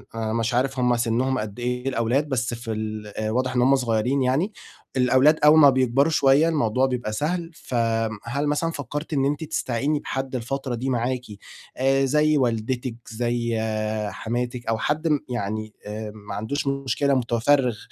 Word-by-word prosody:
آآ 110 -1 -2
مش 115 +1 0
عارف 130 +2 0
هُم 125 -1 +2
سِنهم 120 +3 0
قدّ 105 +1 -6
إيه 125 +1 -2
الأولاد، 130 +4 0
بس 125 -3 -1
في 115 -1 -5
ال 110 -1 -4
آآ 110 0 -1
واضح 130 +1 -1
إن 125 - +3
هُم 135 +2 +5
صغيّرين 125 +1 0
يعني، 145 +12 +1 0.4
الأولاد 130 +5 +4
أول 155 +1 +8
ما 145 -2 +9
بيكبروا 130 +3 +2
شوية 145 +3 +4
الموضوع 130 -5 +1
بيبقى 125 -5 -2
سهل، 165 +7 -2
فآمم، 115 -5 -1
هل 140 +5 -2
مثلًا 150 +3 0
فكرتِ 150 +2 -5
إن 135 -2 +2
أنتِ 145 +3 -1
تستعيني 145 -1 -1
بحد 135 -1 -4
الفترة 130 +1 -3
دي 130 +3 -3
معاكِ 125 0 0 0.6
آآ، 135 +1 +3
زي 150 +2 +3
والدتِك، 120 0 -1
زي 120 0 -1 0.5
حماتِك 120 +3 -4
أو 115 - +1
حد 150 +7 -1
م 150 -2 +3
يعني 110 -2 -3
آآ، 105 +1 -5
ما 105 -1 -8
عندوش 140 +8 -3
مشكلة 140 0 0
متفرغ 125 0 +2
125 Hz, 165 wpm, -24 LUFS, 115-140 Hz, 0.6 s, ما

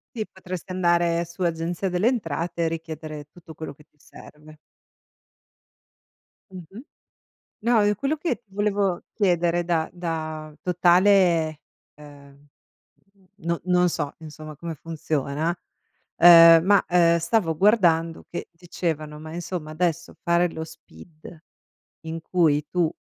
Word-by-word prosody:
Sì, 215 -2 -3
potresti 185 -1 -8
andare 170 -2 +1
su 170 +2 -15
Agenzia 170 +2 -1
delle 180 +3 0
Entrate 170 - -1
e - - +1
richiedere 160 -2 -7
tutto 170 -2 -14
quello 160 - -7
che 150 +1 -20
ti 150 - -43
serve. 150 +1 -16 1.9
Mh-mh. 185 +4 -11 0.8
No, 230 -1 +3
io 205 0 +2
quello 280 +6 -1
che 330 +2 -2
ti 200 - -34
volevo 200 -3 0
chiedere 175 -4 +1
da 165 -2 0
da 155 -3 -5
totale, 175 -3 +3 0.3
ehm, 145 -1 -16 0.7
mhmm, 195 -2 -28 0.2
no 170 0 -1
non 180 0 +3
so, 150 -4 -3
insomma 155 -1 -10
come 165 +2 -6
funziona, 155 0 -3 0.6
ehm, 165 -1 +9
ma, 200 0 +4
ehm, 170 -1 +4
stavo 170 -1 0
guardando 170 -4 +2
che 170 - -6
dicevano: 165 -3 -5
"Ma 155 +1 -9
insomma 175 -2 -5
adesso 170 +1 -2
fare 170 +1 +2
lo 160 - -6
SPID, 160 0 -14 0.7
in 165 0 -5
cui 155 -4 +1
tu 175 -3 0
170 Hz, 130 wpm, -24 LUFS, 160-180 Hz, 1.9 s, ehm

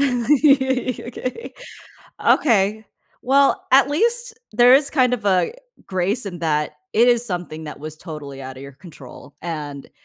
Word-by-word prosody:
Okay. 265 - 0 0.7
Okay. 215 -4 +2 0.4
Well, 275 +2 +2
at 270 +1 +5
least 470 +8 +2 0.2
there 245 +3 +6
is 275 +1 +4
kind 255 -4 +2
of 225 -4 -4
a 190 - +1 0.3
grace 195 +5 -1
in 180 -3 -7
that 150 -2 -1 0.2
it 235 +3 +4
is 240 -1 +3
something 175 -6 -5
that 150 - -9
was 155 +1 -8
totally 145 -5 -9
out 130 0 -9
of 135 - -10
your 140 - -10
control 140 -2 -14
and, 150 -4 -6
215 Hz, 145 wpm, -20 LUFS, 155-260 Hz, 0.7 s, there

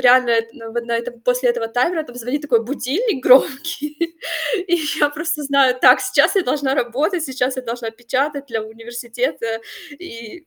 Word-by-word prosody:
реально, 250 -1 +5 0.2
ну 225 -4 -10
вот 235 0 -2
на 235 -1 0
этом 240 0 -6
после 250 +1 +2
этого 235 -1 -2
таймера, 310 +8 0
там 245 -4 -13
звонит 250 +5 -3
такой 235 -6 +2
будильник 280 - -2
громкий, 300 +5 +2 0.5
и 350 - +3 0.2
я 295 -1 +4
просто 310 +1 -3
знаю: 275 -2 +3
"Так, 255 0 +7
сейчас 255 +10 +3
я 385 - +4
должна 270 -1 0
работать, 290 +8 0
сейчас 260 -1 -1
я 260 - -4
должна 235 -1 -4
печатать 270 +5 -2
для 225 -4 -3
университета. 230 0 -4 0.3
И, 290 0 -11
255 Hz, 165 wpm, -20 LUFS, 235-290 Hz, 0.5 s, Так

